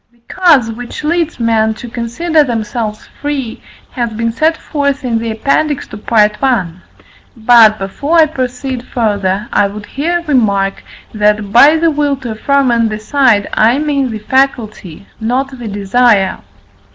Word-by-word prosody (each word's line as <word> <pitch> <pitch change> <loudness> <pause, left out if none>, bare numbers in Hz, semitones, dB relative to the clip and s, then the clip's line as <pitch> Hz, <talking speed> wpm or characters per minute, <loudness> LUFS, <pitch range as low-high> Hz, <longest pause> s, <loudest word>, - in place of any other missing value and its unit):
The 240 - -31
cause 305 -11 +3
which 245 +5 -8
leads 330 -2 -1
men 220 -1 +1
to 240 - -9
consider 275 +8 0
themselves 225 -3 -4
free 275 -6 -4 0.3
has 240 -3 -3
been 230 +1 -2
set 315 +7 +1
forth 280 -3 -2
in 230 -2 0
the 230 0 -4
Appendix 275 +6 -1
to 205 - -8
Part 210 -1 +1
I. 240 -10 +1 0.7
But, 225 -1 +5
before 280 - -2
I 320 - +7
proceed 255 -3 -4
further, 205 -4 -2
I 205 - +3
would 205 +1 -9
here 340 +8 -2
remark 200 -9 0 0.3
that, 210 -1 0
by 290 +8 +6
the 330 0 +2
will 290 -1 0
to 250 -3 -6
affirm 275 +4 +1
and 230 -1 +1
decide, 215 0 +1
I 230 +4 +3
mean 285 -3 -1
the 220 - -4
faculty, 215 - -2
not 255 +5 -1
the 235 - -6
desire. 205 0 +1
235 Hz, 150 wpm, -13 LUFS, 215-280 Hz, 0.7 s, I